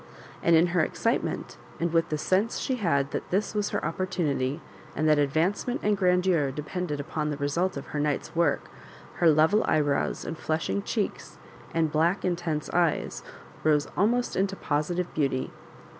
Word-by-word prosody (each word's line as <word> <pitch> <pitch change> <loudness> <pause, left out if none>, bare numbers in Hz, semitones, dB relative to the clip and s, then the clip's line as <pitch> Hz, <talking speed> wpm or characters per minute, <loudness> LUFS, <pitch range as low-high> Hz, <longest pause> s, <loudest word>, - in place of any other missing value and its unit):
And 170 - +4
in 165 +2 +5
her 180 - +4
excitement, - - -1 0.2
and 170 0 -1
with 165 -1 +2
the 155 - -1
sense 190 +8 +1
she 260 - -1
had 140 - +1
that - - -4
this 200 +4 0
was 210 -1 0
her - - -2
opportunity, 165 -7 -1 0.4
and 155 +2 +1
that 150 -1 +5
advancement 165 - 0
and 210 0 +3
grandeur 180 -5 +2
depended 150 +3 -4
upon 150 0 -2
the 145 - -3
result 170 +6 0
of - - -6
her 150 - -1
night's 145 +1 -1
work, 170 0 +1 0.5
her 170 - +5
level 160 +8 +4
eyebrows, 145 -2 +1
and 160 - -5
flushing 155 -11 -1
cheeks, - - -3 0.3
and 160 -2 +1
black 165 +6 +1
intense 170 -4 -1
eyes, 170 -2 +1 0.4
rose 150 -2 +3
almost 240 +5 +1
into 195 +1 0
positive 175 +3 -1
beauty. 135 -4 0
165 Hz, 160 wpm, -27 LUFS, 150-185 Hz, 0.5 s, in